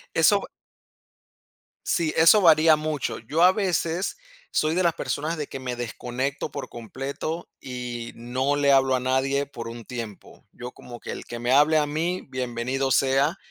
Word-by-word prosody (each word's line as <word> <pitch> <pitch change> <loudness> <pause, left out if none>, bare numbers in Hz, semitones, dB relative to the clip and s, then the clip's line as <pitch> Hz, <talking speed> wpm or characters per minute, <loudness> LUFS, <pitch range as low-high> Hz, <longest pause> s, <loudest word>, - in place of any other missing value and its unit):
Eso - - +5
va - - -8 1.4
Sí, 165 -3 0
eso 165 +6 +7
varía 160 -2 +6
mucho. 150 -2 -3
Yo 145 +9 -2
a 180 - +8
veces 185 -2 -1 0.3
soy 155 +1 +1
de 185 - +2
las 170 -1 +3
personas 155 +3 -3
de 150 -2 -4
que 135 - -7
me 125 -1 -4
desconecto 125 +4 -4
por - - -6
completo 135 +8 -5
y 125 -2 -6
no 130 +4 -1
le 145 -1 +3
hablo 135 -1 +4
a - - 0
nadie 130 +2 +1
por 125 -5 -8
un 115 0 -8
tiempo. 115 -5 -8
Yo 125 0 -8
como 120 -1 -11
que - - -7
el - - -7
que 120 - -7
me 120 +1 -1
hable 150 +4 +5
a 150 - +3
mí, 165 +5 -2
bienvenido 130 +1 -2
sea. 135 +6 +2
135 Hz, 175 wpm, -25 LUFS, 125-155 Hz, 1.4 s, a